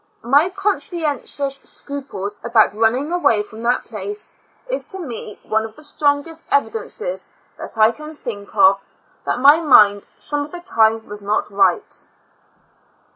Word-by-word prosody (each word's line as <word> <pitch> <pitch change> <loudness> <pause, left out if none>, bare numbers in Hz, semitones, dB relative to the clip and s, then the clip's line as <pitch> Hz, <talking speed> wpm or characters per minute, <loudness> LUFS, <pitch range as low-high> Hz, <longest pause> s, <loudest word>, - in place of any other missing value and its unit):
My 285 +9 +4
conscientious 300 - -2
scruples 265 -11 -6
about 230 -3 +3
running 230 +8 +1
away 230 -12 +2
from 220 +2 -12
that 240 +2 +1
place, 415 +1 -6 0.3
is - - -1
to 385 - -3
me 235 - -7
one 220 0 0
of 220 0 -8
the 305 - -11
strongest 295 +2 0
evidences 450 - -1 0.3
that - - -7
I 220 +1 +6
can 305 +4 -10
think 215 -8 -8
of, 195 -1 +5 0.5
that - - 0
my 285 +5 +7
mind, 205 -10 +5
some 290 -1 -2
of 295 - -10
the 355 - -7
time, 225 -11 +2
was 205 0 -8
not 205 +1 -1
right. 195 -3 +1
275 Hz, 145 wpm, -20 LUFS, 220-310 Hz, 0.5 s, my